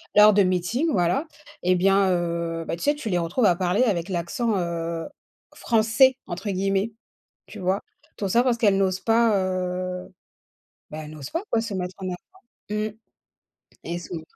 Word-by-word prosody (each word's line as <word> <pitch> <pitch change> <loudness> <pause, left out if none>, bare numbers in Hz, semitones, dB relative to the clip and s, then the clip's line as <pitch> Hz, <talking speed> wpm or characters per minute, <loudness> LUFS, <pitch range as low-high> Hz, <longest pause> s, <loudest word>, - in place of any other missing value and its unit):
Lors 210 +1 +8
de 200 0 +5
meetings, 185 - 0
voilà, 180 - +1 0.4
et 180 +1 +3
bien, 195 +1 +3
heu, 170 -1 -1
bah, - - -1
tu - - -8
sais, 290 - +3
tu 290 -6 -7
les 180 - +1
retrouves 170 +8 0
à 180 -4 +5
parler 185 +6 +1
avec 190 -7 0
l'accent, 195 +5 -1
heu, 170 -2 -3 0.5
«français,» 230 +3 +4
entre 185 +4 -4
guillemets. 195 +3 0 0.5
Tu 215 - -10
vois? 185 +2 0 0.3
Tout 200 - -2
ça 235 +6 +4
parce 245 -2 +2
qu'elles 205 -4 +4
n'osent 190 -1 +1
pas, 225 -1 +3
heu, 185 -1 -3 0.8
bah, 155 - -6
elles 150 - -10
n'osent 150 -3 -8
pas, 335 - -2
quoi, 230 - +2
se 225 -2 -5
mettre 180 -1 -4
en 190 - -4
avant. 180 - -4 0.5
Mmh, 210 0 -1 1.0
et 170 +1 -3
sou 170 -1 -6
185 Hz, 175 wpm, -24 LUFS, 175-215 Hz, 1.0 s, Lors